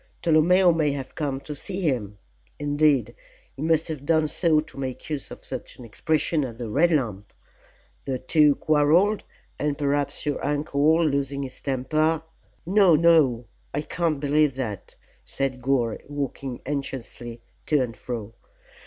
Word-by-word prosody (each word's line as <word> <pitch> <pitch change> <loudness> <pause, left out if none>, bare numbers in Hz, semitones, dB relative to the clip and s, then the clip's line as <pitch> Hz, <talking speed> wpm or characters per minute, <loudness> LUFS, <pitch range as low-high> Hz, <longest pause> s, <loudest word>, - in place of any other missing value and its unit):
Tolomeo 175 +3 +5
may 155 -3 +1
have 135 -2 -6
come 140 -4 -2
to 150 - -7
see 190 +6 -4
him 120 - -1 0.4
indeed, 145 -5 +2 0.4
he 135 - -9
must 160 0 +2
have 155 -4 -5
done 155 +1 +2
so 160 0 +2
to 150 -2 -7
make 130 +2 -5
use 145 -3 -4
of - - -10
such - - -7
an 125 - -10
expression 155 +6 0
as 120 -4 -6
the 120 -2 -5
'Red 160 +8 +4
Lamp.' 110 - -1 0.7
The 135 -2 -1
two 145 +3 +4
quarrelled, 160 +8 +3 0.4
and 145 -1 -1
perhaps 145 0 -1
your 145 -2 -2
uncle, 150 +2 +2
losing 140 -1 -1
his 130 -1 -8
temper 155 +4 0 0.2
" - - -37
"No, 190 -2 +5
no! 150 -7 +4 0.3
I 145 - 0
can't 165 -2 -1
believe 145 -1 +2
that," 110 -7 -5 0.3
said 135 -2 -3
Gore, 120 -4 0
walking 140 -3 -4
anxiously 130 -4 -5 0.3
to 150 -4 +3
and 115 -2 -6
fro. 115 0 -6
145 Hz, 155 wpm, -25 LUFS, 130-155 Hz, 0.7 s, Tolomeo